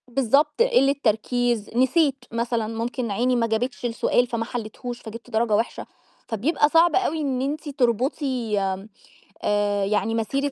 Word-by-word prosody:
بالضبط 275 - +2
قلّة 465 - +4
تركيز، 235 0 0
نسيت 265 +1 +2
مثلًا 230 -1 -1
ممكن 230 +1 -3
عيني 245 +5 +1
ما 230 -1 +1
جابتش 245 +3 -2
السؤال 240 +1 +1
فما 235 -1 -2
حليتهوش 240 +1 -6
فجِبت 230 +2 -10
درجة 225 -1 +1
وحشة، 225 +3 -2 0.4
فبيبقى 285 +7 +1
صعب 330 0 +4
أوي 320 -4 +1
إن 265 -3 -1
أنتِ 295 +3 -3
تربطي 250 -3 0 0.8
آآ، 205 -1 +1
يعني 215 +3 0
مسيرة 275 +6 -1
245 Hz, 135 wpm, -24 LUFS, 225-275 Hz, 0.8 s, قلّة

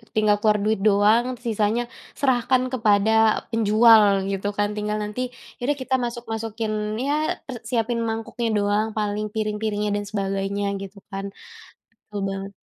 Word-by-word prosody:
tinggal 215 -1 +3
keluar 210 0 +3
duit 215 -1 +1
doang 210 +3 +4 0.2
sisanya 220 0 +1 0.4
serahkan 255 -1 +2
kepada 215 -3 +3 0.4
penjual 225 0 +6 0.3
gitu 195 +1 -2
kan, 205 0 +2
tinggal 210 0 -1
nanti 210 +4 -4 0.4
ya - - -33
udah 290 - +2
kita 260 0 0
masuk-masukin 225 -2 -4 0.3
ya 285 - +1 0.3
per 260 - -6
siapin 235 -1 0
mangkuknya 225 +1 -3
doang 205 +1 +1
paling, 210 0 -1
piring-piringnya 210 -1 -1
dan 205 - -4
sebagainya 195 0 -2 0.2
gitu 195 +1 -9
kan. 195 0 -4 0.8
Betul 205 -1 -5
banget. 195 0 -5
215 Hz, 135 wpm, -23 LUFS, 205-230 Hz, 0.8 s, penjual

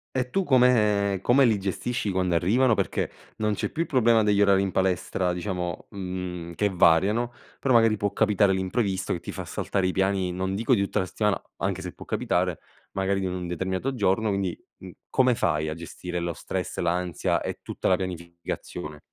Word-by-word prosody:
e 125 -1 0
tu 195 +8 0
come 105 - +3
come 135 +3 +5
li 115 -4 +4
gestisci 100 +3 -2
quando 90 -2 +1
arrivano? 115 +8 +3
Perché - - -1 0.3
non 105 -1 0
c'è - - -2
più 160 - -3
il 170 - -1
problema 120 -4 +4
degli 105 -1 +3
orari 100 -1 +4
in 100 -1 -1
palestra 90 -1 0
diciamo, 90 -2 -4
mhmm, 90 -3 -5
che 105 +4 +1
variano, 95 +7 +3 0.3
però 130 - +1
magari 115 -2 +5
può 100 0 -1
capitare 105 -2 +3
l'imprevisto 95 0 -1
che 85 - -3
ti - - -7
fa - - -5
saltare 95 -1 -1
i - - +1
piani, 95 -1 +1
non 95 +1 -2
dico 115 +5 +2
di 100 - +1
tutta 100 - -1
la 95 - 0
settimana, 105 +2 0 0.2
anche - - -2
se - - -6
può - - -12
capitare, 90 -2 0 0.3
magari 95 0 0
di - - -1
un 90 -1 -3
determinato 95 +9 -2
giorno. 105 0 +1
Quindi, 95 -3 -1 0.2
mhmm, 95 - -10 0.2
come 130 -1 +3
fai 80 -8 0
a 75 - -2
gestire 90 +2 -6
lo 85 0 -2
stress, 90 +2 -4
l'ansia 90 -1 0
e - - -5
tutta - - -3
la 95 - +5
pianificazione? 85 -3 -6
95 Hz, 190 wpm, -26 LUFS, 90-110 Hz, 0.3 s, come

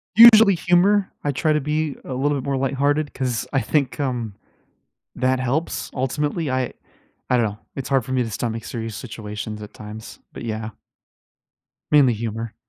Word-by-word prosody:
Usually, 220 -3 +9
humor. 185 +4 +3
I 145 - +1
try 155 +3 +1
to 150 - +1
be 150 0 -1
a 130 - -6
little 140 +3 +1
bit - - -6
more 135 -1 0
lighthearted 140 +2 0
'cause 125 -4 -2
I 135 - +3
think, 140 -2 0
um, 120 -7 -2 0.8
that 130 0 +1
helps 135 +6 -2
ultimately. 145 +4 -1
I 130 -1 -1 0.6
I 125 - +4
don't 115 - +3
know. 105 +1 -4 0.2
It's 135 - -5
hard 135 -4 +2
for 130 - -4
me 125 -1 +2
to 115 - -5
stomach 115 +1 -3
serious 115 -2 -5
situations 105 -2 -6
at 105 - -10
times. 105 +1 -10
But, - - -7
yeah 110 0 -3 1.2
mainly 140 -5 +6
humor. 115 0 -4
130 Hz, 170 wpm, -22 LUFS, 115-145 Hz, 1.2 s, Usually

